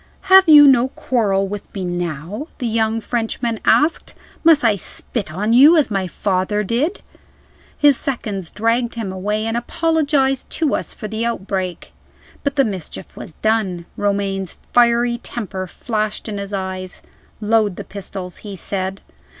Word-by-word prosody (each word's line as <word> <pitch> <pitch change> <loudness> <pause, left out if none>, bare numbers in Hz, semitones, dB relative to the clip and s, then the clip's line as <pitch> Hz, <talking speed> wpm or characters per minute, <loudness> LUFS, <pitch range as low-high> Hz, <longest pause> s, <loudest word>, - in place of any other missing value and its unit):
"Have 380 -3 +8
you 295 -2 +10
no 255 -2 +5
quarrel 205 -7 0
with 205 +1 -7
me 190 -2 -3
now?" 175 - -4
the 255 - -4
young 225 0 0
Frenchman 230 0 -2
asked. 310 +3 +2 0.3
"Must 320 -4 +5
I 225 -3 +4
spit 200 0 -5
on 210 +7 0
you, 290 +7 +8
as 290 -7 +2
my 195 -2 -1
father 195 +3 -1
did?" 265 - -1 0.7
His 290 -3 +5
seconds 210 - -3
dragged 230 +2 0
him 220 -5 -4
away, 210 +3 -2
and 225 0 -1
apologized 285 0 0
to 315 -4 +1
us - - -2
for 215 - -7
the 220 +2 -3
outbreak. 190 -5 -3 0.5
But 280 -1 -1
the 275 -2 +3
mischief 190 -7 -6
was 160 - -10
done. 205 -6 0
Romayne's 200 -2 -2 0.2
fiery 240 0 +3
temper 195 -6 -5
flashed 215 +3 -3
in 205 -2 -4
his 200 0 -6
eyes. 190 -2 -4 0.4
"Load 215 -2 +2
the - - -6
pistols," 190 -2 -7
he 205 -2 -8
said. 190 +1 -4
215 Hz, 150 wpm, -19 LUFS, 195-245 Hz, 0.7 s, you